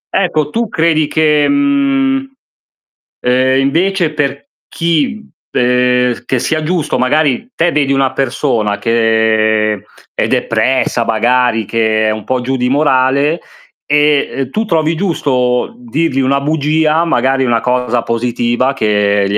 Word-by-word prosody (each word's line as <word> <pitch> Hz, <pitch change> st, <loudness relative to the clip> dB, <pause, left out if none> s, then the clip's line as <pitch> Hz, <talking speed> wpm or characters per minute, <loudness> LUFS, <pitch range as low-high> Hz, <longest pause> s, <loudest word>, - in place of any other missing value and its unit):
Ecco, 155 Hz, -6 st, 0 dB
tu 230 Hz, -2 st, -2 dB
credi 160 Hz, -2 st, +1 dB
che, 150 Hz, -2 st, +2 dB
mhmm, 275 Hz, -1 st, +1 dB, 1.0 s
ehm, 130 Hz, +1 st, +2 dB
invece 170 Hz, +4 st, 0 dB
per 140 Hz, -1 st, -3 dB, 0.2 s
chi 215 Hz, -, -1 dB, 0.2 s
per 125 Hz, 0 st, +1 dB
che 130 Hz, -, -1 dB
sia 155 Hz, +5 st, -1 dB
giusto, 160 Hz, -4 st, -1 dB
magari 150 Hz, -, 0 dB
te 170 Hz, +1 st, +1 dB
vedi 140 Hz, -2 st, +1 dB
una 135 Hz, -1 st, +1 dB
persona 120 Hz, -5 st, -1 dB
che 110 Hz, -1 st, +1 dB, 0.3 s
è -, -, -1 dB
depressa 130 Hz, -2 st, 0 dB
magari, 115 Hz, 0 st, +1 dB
che 110 Hz, 0 st, 0 dB
è -, -, +1 dB
un 110 Hz, -1 st, -5 dB
po' 130 Hz, -1 st, -1 dB
giù 130 Hz, +2 st, -2 dB
di 125 Hz, 0 st, 0 dB
morale 140 Hz, +2 st, +2 dB, 0.5 s
e, 150 Hz, 0 st, +2 dB
ehm, 135 Hz, -2 st, -4 dB
tu 220 Hz, +9 st, -2 dB
trovi 160 Hz, -3 st, 0 dB
giusto 140 Hz, -, -1 dB
dirgli 165 Hz, -, -2 dB
una 135 Hz, +1 st, +1 dB
bugia, 155 Hz, +2 st, +1 dB
magari, 135 Hz, -3 st, +1 dB
una 120 Hz, -2 st, +1 dB
cosa 125 Hz, -1 st, 0 dB
positiva 120 Hz, +2 st, -1 dB
che 105 Hz, -4 st, +1 dB
gli 105 Hz, -, 0 dB
135 Hz, 135 wpm, -14 LUFS, 120-160 Hz, 1.0 s, che